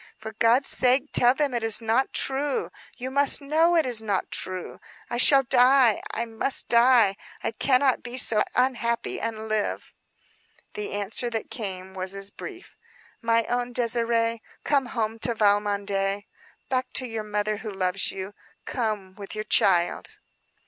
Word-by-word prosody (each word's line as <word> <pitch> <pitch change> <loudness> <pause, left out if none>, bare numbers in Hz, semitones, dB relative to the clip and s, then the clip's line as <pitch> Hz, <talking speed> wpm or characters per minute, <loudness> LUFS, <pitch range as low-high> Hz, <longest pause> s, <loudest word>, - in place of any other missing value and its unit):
For 220 0 -8
God's 230 +5 +2
sake 260 +3 +2
tell 245 +1 +5
them 290 -3 0
it 240 -1 -2
is 225 -1 +4
not 230 +3 0
true. 275 +1 -1 0.3
You 260 +1 -5
must 280 +1 +3
know 315 +4 +2
it 325 - +3
is 240 -3 +2
not 205 -4 -2
true. 185 -1 -4 0.3
I 240 - -1
shall 270 +2 +6
die. 250 -2 +4
I 235 - -3
must 230 +4 -1
die. 235 -4 +5 0.3
I - - -1
cannot 260 +2 +2
be 245 +1 -7
so 220 -4 +3
unhappy, 240 -2 0
and 220 -1 -4
live." 215 -1 -2 0.8
The 420 0 -5
answer 205 +4 -1
that 225 -2 -5
came 190 -4 -6
was 195 +1 -3
brief: 370 - -10 0.5
"My 230 0 +2
own 245 +1 -3
Désirée: 230 -1 +1 0.2
Come 275 -3 +1
home 225 -2 -3
to 235 +1 0
Valmondé; 200 -1 0 0.4
back 255 -1 -2
to 255 - -2
your 225 -2 -4
mother 210 0 -2
who 220 +1 -7
loves 185 -1 -1
you. 190 +1 -7 0.3
Come 215 -6 -3
with 200 +2 -9
your 215 - -3
child." 175 -4 +1
230 Hz, 155 wpm, -25 LUFS, 205-255 Hz, 0.8 s, shall